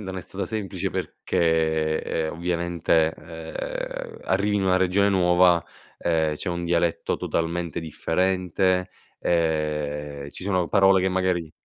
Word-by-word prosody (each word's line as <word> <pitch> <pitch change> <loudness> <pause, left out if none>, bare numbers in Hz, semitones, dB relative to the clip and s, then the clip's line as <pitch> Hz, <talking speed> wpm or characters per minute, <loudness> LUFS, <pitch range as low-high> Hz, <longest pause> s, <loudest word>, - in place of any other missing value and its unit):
Non 95 -2 -6
è - - -3
stata 95 +3 -5
semplice 105 -4 -3
perché, 80 -2 0
ehm, 80 -1 -2
ovviamente, 85 -2 +1
ehm, - - -6
arrivi 100 +2 +1
in 100 - 0
una 95 -1 +3
regione 95 +2 +3
nuova, 90 -2 +4 0.3
ehm, 80 -2 +1
c'è 85 - -5
un 85 0 -2
dialetto 85 -1 0
totalmente 85 0 -2
differente, 90 +3 0 0.3
ehm, 75 -3 -1
ci - - -10
sono 90 -2 +1
parole 95 -1 +5
che 95 - +2
magari 90 -3 0
85 Hz, 130 wpm, -25 LUFS, 80-95 Hz, 0.3 s, parole